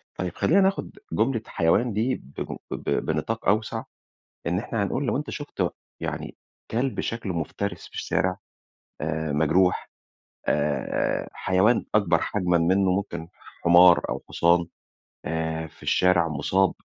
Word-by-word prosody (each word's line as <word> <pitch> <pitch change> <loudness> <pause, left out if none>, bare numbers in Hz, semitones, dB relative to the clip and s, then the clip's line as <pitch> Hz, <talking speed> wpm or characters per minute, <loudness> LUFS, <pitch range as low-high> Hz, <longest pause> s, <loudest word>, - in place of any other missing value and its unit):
طيب، 90 -2 -3
خلينا 195 +5 +4
ناخد 195 - 0
جملة 125 -5 +1
حيوان 105 +8 +2
دي 115 +5 +1 0.2
بمن - - -4
ب - - -4 0.2
بنطاق 80 +9 -2
أوسع، 110 +2 +1 0.6
إن 90 +2 +1
إحنا 110 -1 -2
هنقول 135 +8 -1
لو 120 - +1
أنت 150 - -4
شُفت 145 -1 -2 0.3
يعني - - -4 0.4
كلب 125 +3 -1
شكلُه 115 -5 -3
مفترِس 85 +5 -3
في - - -16
الشارع 95 0 0 0.6
آآ، 80 0 -2
مجروح، 85 +5 +2 0.6
آآ، 75 -2 0
حيوان 95 +6 +2
أكبر 95 -6 +4
حجمًا 90 -4 +1
منه، 95 +3 +3
ممكن 85 -4 -3 0.4
حمار 85 +1 +7
أو - - -3
حصان، 85 0 +3 0.6
آآ، 80 0 -2
في 75 - -19
الشارع 90 -2 +3
مُصاب 95 +5 +1
90 Hz, 130 wpm, -25 LUFS, 85-110 Hz, 0.6 s, حمار